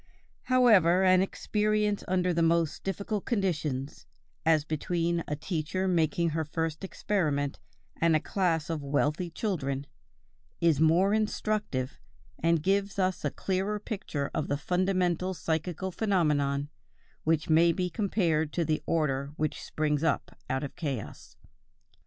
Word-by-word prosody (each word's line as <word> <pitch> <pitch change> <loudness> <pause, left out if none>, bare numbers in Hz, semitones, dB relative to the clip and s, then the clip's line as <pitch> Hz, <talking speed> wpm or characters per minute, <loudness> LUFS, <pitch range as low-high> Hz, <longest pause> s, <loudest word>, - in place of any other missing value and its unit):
However, 205 -9 +5
an 185 -1 +5
experience 210 +1 0
under 180 -1 +1
the 170 - +1
most 165 -1 +1
difficult 200 +2 -3
conditions, 150 - -2 0.4
as 155 -2 +4
between 170 +2 -1
a 150 - -1
teacher 165 +4 -2
making 170 -1 +2
her 160 +1 -1
first 160 +2 -3
experiment, 155 -8 -1 0.4
and 165 -1 +3
a - - +4
class 165 -3 0
of 160 -2 -2
wealthy 145 +4 0
children, 145 -8 -2 0.7
is 165 -4 +3
more 170 +6 +4
instructive, 210 -10 -1 0.4
and 165 -1 +2
gives 200 +2 +1
us 185 -1 0
a - - +1
clearer 195 +2 -2
picture 160 -9 -4
of 150 - -1
the 145 - 0
fundamental 185 +2 0
psychical 170 +3 -2
phenomenon, 150 -9 +1 0.5
which 160 -1 +1
may 165 +2 +5
be 180 +1 -1
compared 170 -5 0
to 170 - 0
the 155 -1 0
order 140 -3 0
which 155 -1 -2
springs 150 -1 -1
up 160 -3 0
out 130 +2 -1
of 140 - -6
chaos. 135 - -5
170 Hz, 135 wpm, -29 LUFS, 150-190 Hz, 0.7 s, However